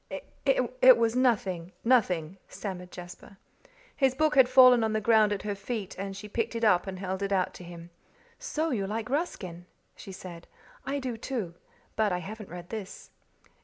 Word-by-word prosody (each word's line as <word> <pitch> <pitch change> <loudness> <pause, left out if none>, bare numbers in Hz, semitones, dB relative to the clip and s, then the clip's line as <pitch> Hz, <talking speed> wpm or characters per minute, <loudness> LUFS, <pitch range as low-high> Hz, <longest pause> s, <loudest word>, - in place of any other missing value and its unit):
"It - - +5
was 230 0 +1
nothing 195 -9 0
nothing," 190 -8 +2
stammered 180 -3 -6
Jasper. 180 +2 -11 0.6
His 265 -2 +2
book 310 +1 +2
had 265 -3 +6
fallen 255 -2 +7
on 220 -1 0
the 215 - +1
ground 215 -1 +4
at 200 -2 -2
her 205 -1 -2
feet, 200 0 -5
and 195 0 -5
she 210 - -8
picked 230 +2 -2
it 230 - -3
up 195 -3 +3
and 190 -1 -5
held 190 0 -4
it 200 0 -2
out 185 -2 +1
to - - -11
him. 170 0 -11 0.5
"So 315 +1 -2
you 200 -6 -1
like 225 +4 -4
Ruskin," 185 - -3 0.3
she 195 - -10
said. 175 -2 -10 0.4
"I 280 - -1
do, 255 -4 -4
too. 220 -8 -4 0.4
But 215 -2 +1
I 180 - 0
haven't 210 +3 -8
read 175 0 -9
this." 210 -4 -7
210 Hz, 180 wpm, -28 LUFS, 185-245 Hz, 0.6 s, fallen